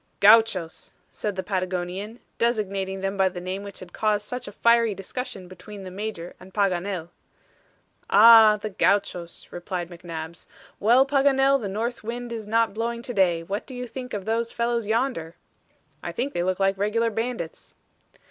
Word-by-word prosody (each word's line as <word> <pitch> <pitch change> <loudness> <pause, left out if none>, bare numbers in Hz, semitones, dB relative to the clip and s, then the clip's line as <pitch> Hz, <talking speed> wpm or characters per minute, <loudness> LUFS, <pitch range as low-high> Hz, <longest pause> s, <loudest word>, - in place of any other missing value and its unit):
"Gauchos," 205 -5 +4 0.2
said 210 -2 -4
the 190 - -3
Patagonian, 185 +3 -3 0.2
designating 195 -5 -1
them 195 +1 -2
by 190 -1 +3
the 180 -1 -7
name 185 +2 -4
which 200 -1 -10
had 180 -1 -11
caused 210 -1 0
such 250 +2 -6
a - - -6
fiery 230 0 +3
discussion 195 -1 -6
between 190 +3 -11
the 185 - -8
Major 190 -3 -5
and 185 +1 -15
Paganel. 185 -3 -1 1.0
"Ah! 220 0 +8
the 215 +1 -5
Gauchos," 185 -3 0
replied 175 0 -5
McNabbs. 170 -1 -8 0.3
"Well, 240 +5 +5
Paganel, 275 -1 +3
the 205 - -3
north 230 +4 -3
wind 240 +1 -5
is 220 -2 -6
not 225 0 +2
blowing 235 +2 -3
to 245 - -5
day. 175 -5 +2
What 200 +5 -4
do 260 - -8
you 250 0 -4
think 250 0 -7
of 195 -2 -5
those 230 +1 -1
fellows 235 -2 -1
yonder?" 220 -8 -1 0.7
"I 170 - -4
think 260 +10 -3
they 175 - -1
look 185 +1 -1
like 195 0 +1
regular 225 +3 +1
bandits." 225 -6 -5
205 Hz, 165 wpm, -25 LUFS, 185-230 Hz, 1.0 s, Ah